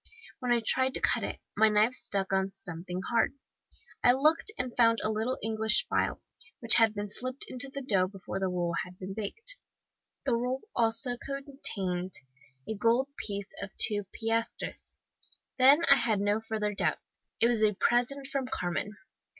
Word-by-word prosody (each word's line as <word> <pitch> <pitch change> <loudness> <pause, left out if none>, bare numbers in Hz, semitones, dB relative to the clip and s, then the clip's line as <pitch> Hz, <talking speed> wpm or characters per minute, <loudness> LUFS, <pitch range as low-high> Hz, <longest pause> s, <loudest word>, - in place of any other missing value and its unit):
"When 250 -2 -2
I 240 -1 +3
tried 260 +2 +2
to - - +2
cut - - +2
it, - - -5
my 220 +1 +5
knife 215 +3 +3
struck 195 -5 -2
on 190 0 +1
something 180 +1 -6
hard. 235 +3 +2 0.7
I 245 - +7
looked, 310 +9 +2
and 250 -1 -3
found 230 -2 +4
a 215 - +1
little 220 +4 -1
English 220 - +3
file, - - 0 0.4
which - - +6
had 225 -2 +5
been 205 0 -3
slipped 255 +6 -4
into 255 +2 -3
the 275 0 -6
dough 195 -7 +2
before 190 0 -6
the 190 - 0
roll 175 -2 -1
had 180 0 -12
been 190 +1 -6
baked. 450 - -5 0.7
The 255 -4 +2
roll 250 +3 -2
also 230 +2 +1
contained 225 -11 -3 0.5
a 220 - -3
gold 235 +6 +2
piece 200 -1 -5
of 200 - -5
two 205 -3 +2
piastres. 225 +1 -3 0.7
Then 280 +6 +6
I 275 - +8
had 225 -4 +1
no 205 +2 +1
further 210 -1 -1
doubt - - 0 0.4
it - - +5
was 235 -2 +2
a 210 -2 +3
present 245 +6 +1
from 275 -1 -3
Carmen. 190 +1 -3
225 Hz, 170 wpm, -29 LUFS, 200-255 Hz, 0.7 s, I